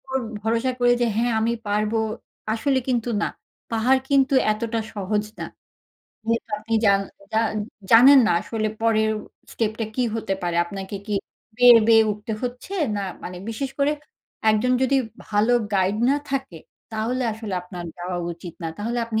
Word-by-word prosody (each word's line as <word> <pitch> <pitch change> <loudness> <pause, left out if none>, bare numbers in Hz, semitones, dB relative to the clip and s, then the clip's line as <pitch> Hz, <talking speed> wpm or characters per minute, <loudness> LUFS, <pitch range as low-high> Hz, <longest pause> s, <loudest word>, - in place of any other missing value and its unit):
উপর 265 0 -3 0.2
ভরসা 230 +4 +1
করে 245 0 +4
যে, - - +3
হ্যাঁ 235 +1 +1
আমি 230 +1 +1 0.2
পারবো, 210 +2 +1 0.5
আসলে 260 +4 +1
কিন্তু 245 -2 0
না। - - +1 0.4
পাহাড় 245 +4 +3
কিন্তু 275 0 +3 0.2
এতটা 225 +1 -2
সহজ 210 +1 -1
না। - - -4 0.8
যেহেতু 230 +1 0
আপনি 220 +2 -3
জান 200 -1 +5 0.3
জান 220 0 +2 0.4
জানেন 260 +5 +9
না - - +2
আসলে 215 +2 -2
পরের 220 -1 +2 0.4
স্টেপটা 220 0 -1
কি 255 - +1
হতে 195 -3 -2
পারে? 175 -1 -1
আপনাকে 195 +2 -7
কি 210 - -4 0.4
বেয়ে, 245 -1 +9
বেয়ে 225 -1 +7
উঠতে 210 +2 -6
হচ্ছে 250 +9 -5 0.2
না - - -1 0.2
মানে 180 - -6
বিশেষ 260 +4 -3
করে 285 +1 +3 0.6
একজন 215 +4 +2
যদি 265 +1 +3 0.3
ভালো 215 +3 +2 0.2
গাইড 195 +1 +2
না 280 - +3
থাকে 265 -11 -3 0.3
তাহলে 230 +4 -1
আসলে 215 -3 -5
আপনার 180 -1 -8
যাওয়া 175 +1 -3
উচিত 170 0 -10
না। - - -2
তাহলে 230 +3 -2
আপনি 220 -1 -1
225 Hz, 160 wpm, -23 LUFS, 210-245 Hz, 0.8 s, জানেন